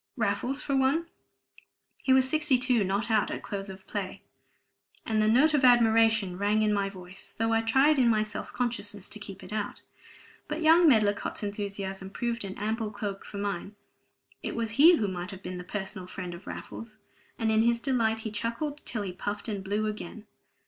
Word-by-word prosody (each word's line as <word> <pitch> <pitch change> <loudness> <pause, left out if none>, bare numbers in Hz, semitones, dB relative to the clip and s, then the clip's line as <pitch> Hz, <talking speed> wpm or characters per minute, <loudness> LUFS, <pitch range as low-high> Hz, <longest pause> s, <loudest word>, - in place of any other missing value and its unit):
"Raffles, 240 +5 0
for 275 - -1
one. 270 +5 +2 1.0
He 265 - +1
was 260 0 +5
62 260 -6 +2
not 200 +4 -1
out 215 -2 +3
at - - -5
close 200 -1 -5
of 190 0 -10
play!" 195 -3 -5 0.8
And 220 -1 +1
the 215 - +3
note 265 +8 +5
of 290 -2 +2
admiration 225 -5 +4
rang 210 +2 +2
in 210 -1 +2
my 200 -1 0
voice, 185 -1 -10
though 225 0 +1
I 225 - +3
tried 270 +6 +4
in 245 -2 +5
my 215 -2 +3
self 215 0 -7
consciousness 210 -5 -2
to 215 - -5
keep 200 -2 -9
it - - -8
out. 210 -1 -4 0.6
But 305 +2 -3
young 330 +2 +6
Medlicott's 210 -4 +2
enthusiasm 200 -2 -4
proved 235 +2 -2
an 195 0 -6
ample 220 +1 -2
cloak 205 -1 -5
for 205 - -9
mine; 200 0 -3 0.7
it - - -4
was 230 -1 -2
he 310 +9 +7
who 215 -10 0
might 180 -1 -4
have 190 -1 -9
been 180 0 -5
the - - -6
personal 190 -1 -5
friend 180 -1 -6
of 170 +2 -11
Raffles; 220 -1 -8 0.4
and 225 -1 +1
in 220 0 +4
his 235 +1 +3
delight 230 -4 +1
he 220 - -5
chuckled 235 +8 -3
till 220 -3 -1
he 185 -2 -5
puffed 205 +4 -4
and 205 -3 -3
blew 205 +3 -1
again. 215 0 -6
215 Hz, 190 wpm, -28 LUFS, 200-235 Hz, 1.0 s, he